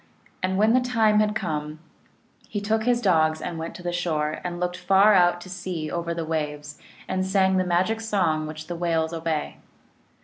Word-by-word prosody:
And 185 0 0
when 215 +3 +4
the 255 - +4
time 225 -4 +3
had 210 0 +1
come, 150 -4 -3 0.7
he 205 - -2
took 220 +2 0
his 245 -1 +2
dogs 160 -6 +3
and 170 -2 -5
went 165 +1 -6
to 180 - -10
the 175 - -2
shore, 155 -4 -1
and 175 -1 -4
looked 180 0 -1
far 195 +3 +5
out 175 -2 +4
to 185 - -10
sea 175 -4 -4
over 170 0 -3
the 165 -1 -3
waves, 150 -2 -4 0.3
and 185 0 -1
sang 190 0 +2
the 185 - +2
magic 185 +5 0
song 170 -8 0
which 155 0 -7
the 175 - -5
whales 165 -1 0
obey. 165 -2 -3
175 Hz, 195 wpm, -25 LUFS, 160-200 Hz, 0.7 s, far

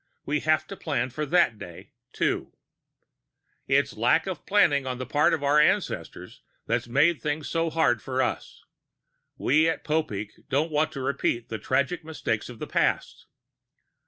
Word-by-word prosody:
We 150 +1 0
have 155 0 +1
to 195 - -8
plan 130 -8 -2
for 150 +4 -3
that 165 -10 +3
day, 90 -4 -11 0.2
too. - - -2 1.1
It's - - +2
the - - -14
lack - - +3
of - - -6
planning 140 -2 +3
on 125 -1 -3
the 130 - -5
part 145 +4 +2
of 145 - -1
our 145 +1 +4
ancestors 150 - -1 0.2
that's - - -1
made 150 +7 +3
things 150 0 -2
so 165 0 0
hard 155 -8 +2
for 130 +3 -3
us. 130 - -2 0.7
We 155 +5 +3
of 165 - -3
Popeek 110 -10 -3
don't 145 +4 +1
want 155 +1 +1
to 135 - -5
repeat 130 -3 -1
the 110 - -4
tragic 140 +7 0
mistakes 150 -9 -3
of 120 - -9
the - - -5
past. - - -1
145 Hz, 165 wpm, -26 LUFS, 125-155 Hz, 1.1 s, our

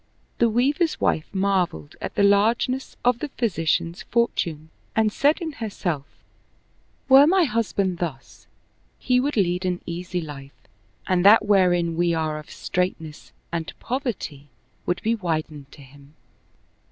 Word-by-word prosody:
The 235 - +4
Weaver's 285 +8 +1
wife 155 - 0
marveled 190 - -1
at - - -5
the 200 - +2
largeness 225 +6 +2
of 245 -1 +3
the 300 - -3
physician's 170 - -1
fortune 165 -9 -1 0.2
and 220 -1 +2
said 290 +5 +2
in 330 -3 -4
herself, 185 - -4 1.0
"Were 270 +2 +8
my 370 +2 +4
husband 205 - -1
thus, 150 -7 -6 0.5
he 250 -1 +2
would 280 0 -1
lead 180 -2 +1
an 180 -1 -1
easy 180 +1 -4
life 145 -4 -9 0.5
and 180 -1 +1
that 210 +2 +7
wherein 175 -4 +3
we 170 -1 +2
are 155 -1 -2
of 150 - -13
strait 180 0 -2
ness 155 -2 -11 0.2
and 165 -1 -3
poverty 230 - -4 0.4
would 175 0 -1
be 225 - +2
widened 155 -8 -3
to 145 - -13
him." 140 +2 -18
185 Hz, 140 wpm, -23 LUFS, 160-230 Hz, 1.0 s, Were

